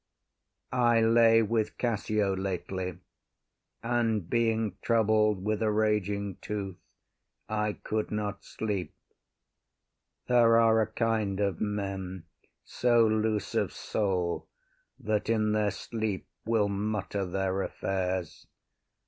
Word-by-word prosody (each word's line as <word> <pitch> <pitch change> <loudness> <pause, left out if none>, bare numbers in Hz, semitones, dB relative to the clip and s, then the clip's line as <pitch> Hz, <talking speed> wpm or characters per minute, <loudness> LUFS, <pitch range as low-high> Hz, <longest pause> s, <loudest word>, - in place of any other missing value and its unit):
I 120 -2 +4
lay 115 0 +5
with 110 0 -1
Cassio 105 -4 0
lately, 95 -1 -3 0.9
And 115 -5 0
being 115 -3 +1
troubled 110 -3 +2
with 110 0 0
a 110 - +2
raging 105 -2 0
tooth, 100 -3 -4 0.7
I 105 -1 -1
could 110 +1 -3
not 105 -2 -3
sleep. 105 -5 -4 1.3
There 120 -2 +5
are 110 -1 +5
a 110 - +1
kind 110 -4 0
of 100 -4 0
men 95 -3 -3 0.4
so 120 -2 +3
loose 110 -1 0
of - - +1
soul, 90 -5 -1 0.5
That 110 -3 -1
in 110 -2 +2
their 105 -1 +2
sleeps 110 -1 -4 0.2
will 110 -3 +3
mutter 100 0 -2
their 95 +1 -1
affairs. 95 -2 -3
105 Hz, 105 wpm, -29 LUFS, 95-110 Hz, 1.3 s, lay